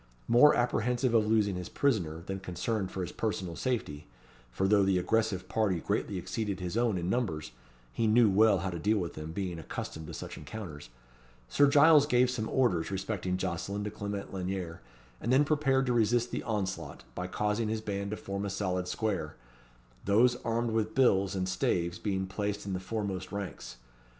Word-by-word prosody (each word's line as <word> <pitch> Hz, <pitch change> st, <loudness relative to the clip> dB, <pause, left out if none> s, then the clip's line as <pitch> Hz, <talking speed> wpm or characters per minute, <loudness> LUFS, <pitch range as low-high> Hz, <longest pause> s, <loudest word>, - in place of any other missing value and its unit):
More 125 Hz, +6 st, +7 dB
apprehensive 120 Hz, +1 st, +1 dB
of 110 Hz, -2 st, +4 dB
losing 105 Hz, -2 st, +3 dB
his 90 Hz, -1 st, -6 dB
prisoner, 85 Hz, -, 0 dB
than 95 Hz, 0 st, -4 dB
concerned 95 Hz, +2 st, -2 dB
for 95 Hz, -, -5 dB
his 90 Hz, -, -4 dB
personal 95 Hz, -6 st, -3 dB
safety 80 Hz, -, -3 dB, 0.4 s
(for 80 Hz, +11 st, 0 dB
though 105 Hz, 0 st, +5 dB
the 95 Hz, -1 st, +3 dB
aggressive 100 Hz, -1 st, 0 dB
party 100 Hz, -6 st, +1 dB
greatly 95 Hz, +4 st, -2 dB
exceeded 95 Hz, +2 st, -3 dB
his 90 Hz, +1 st, -4 dB
own 115 Hz, -4 st, +2 dB
in 85 Hz, 0 st, -3 dB
numbers, 95 Hz, -, -1 dB, 0.4 s
he 115 Hz, -, +1 dB
knew 115 Hz, +1 st, +5 dB
well 105 Hz, +1 st, +5 dB
how 95 Hz, -, -1 dB
to 85 Hz, -, -5 dB
deal 105 Hz, +6 st, +2 dB
with 85 Hz, -4 st, -3 dB
them, 75 Hz, +1 st, -6 dB
being 90 Hz, -2 st, -3 dB
accustomed 80 Hz, 0 st, -6 dB
to -, -, -7 dB
such -, -, -7 dB
encounters), 75 Hz, -, -8 dB, 0.6 s
Sir 145 Hz, -, +5 dB
Giles 145 Hz, +1 st, +6 dB
gave 125 Hz, -2 st, +3 dB
some 110 Hz, -3 st, -3 dB
orders 110 Hz, -11 st, +1 dB
respecting 95 Hz, -1 st, -2 dB
Jocelyn 95 Hz, +3 st, -3 dB
to 105 Hz, -, -4 dB
Clement 100 Hz, -1 st, -5 dB
Lanyere, 90 Hz, -3 st, -4 dB, 0.4 s
and 120 Hz, -, -1 dB
then 135 Hz, +3 st, +5 dB
prepared 135 Hz, -3 st, +2 dB
to 125 Hz, -, +1 dB
resist 120 Hz, +1 st, +2 dB
the -, -, -2 dB
onslaught, 100 Hz, -4 st, -3 dB
by 90 Hz, +1 st, -4 dB
causing 105 Hz, +3 st, -1 dB
his 110 Hz, 0 st, -2 dB
band 100 Hz, -2 st, -3 dB
to 105 Hz, -, -3 dB
form 100 Hz, 0 st, -4 dB
a 100 Hz, -, -2 dB
solid 90 Hz, -2 st, -2 dB
square; 95 Hz, -7 st, -2 dB, 0.7 s
those 115 Hz, +5 st, +4 dB
armed 115 Hz, 0 st, -1 dB
with 110 Hz, -1 st, -1 dB
bills 100 Hz, -7 st, +3 dB
and 95 Hz, -1 st, -1 dB
staves 85 Hz, -2 st, 0 dB
being 95 Hz, -2 st, -1 dB
placed 100 Hz, +2 st, -3 dB
in 100 Hz, -, -3 dB
the 90 Hz, -, -2 dB
foremost 95 Hz, -2 st, -4 dB
ranks. 100 Hz, -9 st, -6 dB
100 Hz, 185 wpm, -30 LUFS, 95-115 Hz, 0.7 s, More